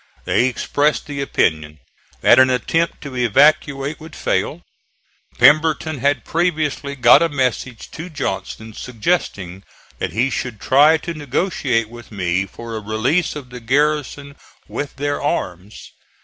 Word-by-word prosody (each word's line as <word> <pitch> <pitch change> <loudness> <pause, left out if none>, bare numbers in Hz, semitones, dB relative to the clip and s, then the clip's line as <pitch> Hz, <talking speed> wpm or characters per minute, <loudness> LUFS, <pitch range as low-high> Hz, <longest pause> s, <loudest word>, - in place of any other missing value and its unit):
They 125 - +2
expressed 145 +3 0
the 140 -1 -5
opinion 80 - 0 0.4
that - - +6
an 130 0 +6
attempt 165 +7 0
to 140 -3 -8
evacuate 140 +4 +2
would 160 0 -11
fail. - - -2 0.7
Pemberton 155 -1 +4
had 140 +3 0
previously 155 -4 -1
got 125 +2 +6
a 170 - +2
message 130 -4 -2
to 165 +3 -7
Johnston 115 -7 -5
suggesting 105 - -2 0.4
that - - -2
he 125 +4 +1
should 120 -5 -4
try 145 +7 +5
to 170 +2 -6
negotiate 140 - -1
with 120 +1 -13
me 95 -1 -1
for 115 +3 -8
a - - -3
release 120 - 0
of 135 -4 -9
the 125 - -8
garrison 140 +2 -1 0.3
with 145 - -5
their 145 +1 -2
arms. 100 - -4
135 Hz, 135 wpm, -19 LUFS, 115-150 Hz, 0.7 s, that